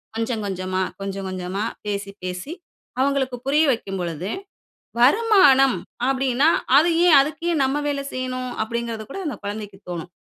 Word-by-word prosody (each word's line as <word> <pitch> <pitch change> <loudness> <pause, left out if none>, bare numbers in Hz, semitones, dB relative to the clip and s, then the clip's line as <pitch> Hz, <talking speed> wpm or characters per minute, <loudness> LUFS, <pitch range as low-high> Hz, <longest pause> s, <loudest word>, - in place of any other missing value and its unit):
கொஞ்சங்கொஞ்சமா, 200 -5 -2 0.2
கொஞ்சங்கொஞ்சமா, 195 0 -4 0.2
பேசி, 200 -1 -3
பேசி 180 - -5 0.5
அவுங்களுக்கு 265 -2 +1
புரிய 295 +3 +3
வைக்கும் 195 -6 -3
பொழுது, 175 +2 -4 0.7
வருமானம் 275 - +5 0.3
அப்பிடீன்னா, 270 +1 +2 0.3
"அது 320 +4 +5 0.2
ஏன்? 330 - +7
அதுக்கு 300 +4 -1
ஏன் 300 - +1
நம்ம 270 +2 +1
வேலை 280 -1 -1
செய்யணும்?" 255 -1 -3
அப்படிங்கிறது 230 0 -3
கூட 335 - -7
அந்த 295 - -2
குழந்தைக்கு 205 -1 -6
தோணும். 175 -1 -5
235 Hz, 130 wpm, -22 LUFS, 195-275 Hz, 0.7 s, ஏன்